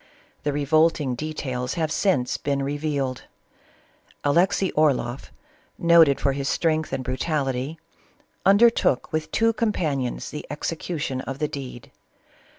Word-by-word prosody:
The 145 - -1
revolting 145 -1 +2
details 130 -2 -4
have 160 -2 -1
since 150 -12 +1
been 140 -1 -1
revealed. 140 -2 -2 1.0
Alexey 180 +6 +2
Orloff, 135 -4 0 0.5
noted 165 -4 +5
for 140 - +1
his 135 0 -2
strength 160 -2 0
and 135 -1 -2
brutality, 135 +1 -2 0.7
undertook 200 - +4
with 155 0 -2
two 225 0 +2
companions 155 - -1
the 150 - -6
ex 150 +3 -3
ecution 155 -5 -3
of 135 - -5
the 150 - -1
deed. 130 -4 -8
145 Hz, 120 wpm, -24 LUFS, 135-165 Hz, 1.0 s, noted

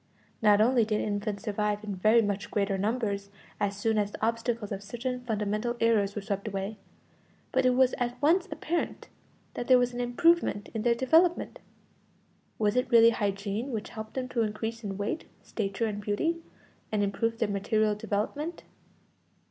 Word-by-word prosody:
Not 210 -1 +5
only 240 +1 +4
did 215 -1 0
infants 205 -1 -2
survive 210 -1 -1
in 205 -2 -4
very 215 +5 +4
much 200 -1 -2
greater 200 -1 0
numbers 200 -1 -1 0.3
as 200 -1 -1
soon 220 +1 +1
as 205 -1 0
the 215 - -2
obstacles 230 -1 -1
of 195 -1 -3
certain 240 +5 -4
fundamental 215 +1 -1
errors 210 -3 +2
were 205 - -4
swept 200 0 -3
away, 200 +1 -4 0.7
but 260 0 +3
it 250 - +3
was 260 0 +4
at 245 0 -2
once 345 +6 +3
apparent 340 +2 -3 0.4
that 240 - -5
there 255 - +7
was 245 0 +1
an 245 - -3
improvement 245 -2 +2
in 220 - -2
their 235 +1 +3
development. 325 +8 +2 1.0
Was 210 0 +1
it 250 - +1
really 230 -1 +7
hygiene 205 +3 -2
which 220 -3 -4
helped 220 -1 -8
them 255 -1 -2
to 240 - 0
increase 225 +2 -3
in 195 -2 -4
weight, 205 +11 -3 0.2
stature, 200 +1 -2
and 210 -2 -3
beauty, 325 - -1 0.5
and 210 -1 +1
improved 225 +3 -1
their 225 - +1
material 210 +2 +1
development? 220 - -3
220 Hz, 170 wpm, -29 LUFS, 205-245 Hz, 1.0 s, there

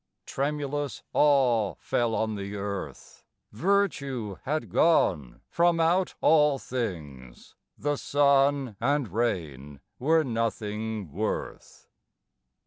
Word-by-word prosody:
Tremulous 145 0 -3
awe 125 -8 +3
fell 115 -2 -1
on 110 -1 -1
the 100 0 -5
earth, 100 -1 -6 0.3
Virtue 140 - -1
had 155 +3 -2
gone 75 - +2
from 170 0 +2
out 175 +3 +2
all 150 -3 +4
things, 75 - -6 0.2
The 145 0 -1
sun 140 -5 +2
and 145 -2 +1
rain 80 - -3 0.2
were 160 +4 +3
nothing 110 - -3
worth. - - -5
125 Hz, 95 wpm, -27 LUFS, 105-145 Hz, 0.3 s, all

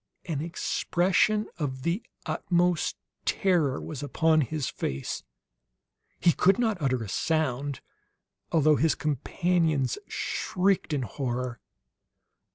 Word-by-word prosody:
An 155 -4 -2
expression 185 +5 +1
of 130 -4 -3
the 170 - 0 0.2
utmost 175 -1 +1 0.3
terror 170 -9 +2
was 150 -5 -6
upon 155 +3 +3
his 150 0 -2
face; 65 0 -3 1.0
he 175 - +5
could 190 +3 +4
not 220 -7 0
utter 130 -4 +1
a - - -6
sound, 140 - -1 0.7
although 155 -2 +4
his 160 0 +3
companions 155 -1 0
shrieked 185 -2 0
in 140 -3 0
horror. 125 0 -3
155 Hz, 105 wpm, -28 LUFS, 135-175 Hz, 1.0 s, he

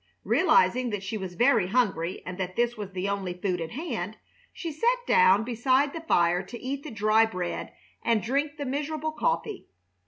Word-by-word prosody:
Realizing 255 - +3
that 205 -3 -4
she 195 +3 -4
was 190 -4 -5
very 235 -5 +3
hungry 190 -6 0
and 185 +1 -6
that 185 -1 -3
this 240 0 +1
was 205 -3 -6
the 185 +1 -2
only 195 -3 -2
food 180 -1 -2
at 165 - -4
hand, 225 - -4 0.3
she 335 - -5
sat 485 +10 0
down 465 - +5
beside 255 +4 +1
the 330 - -5
fire 175 - +2
to 235 +4 -9
eat 275 +2 -4
the 300 - -8
dry 215 0 +3
bread 180 -5 -3 0.3
and 230 -2 +2
drink 285 +7 -1
the 285 - -4
miserable 300 +3 -2
coffee. 435 +3 -2
235 Hz, 185 wpm, -27 LUFS, 190-285 Hz, 0.3 s, down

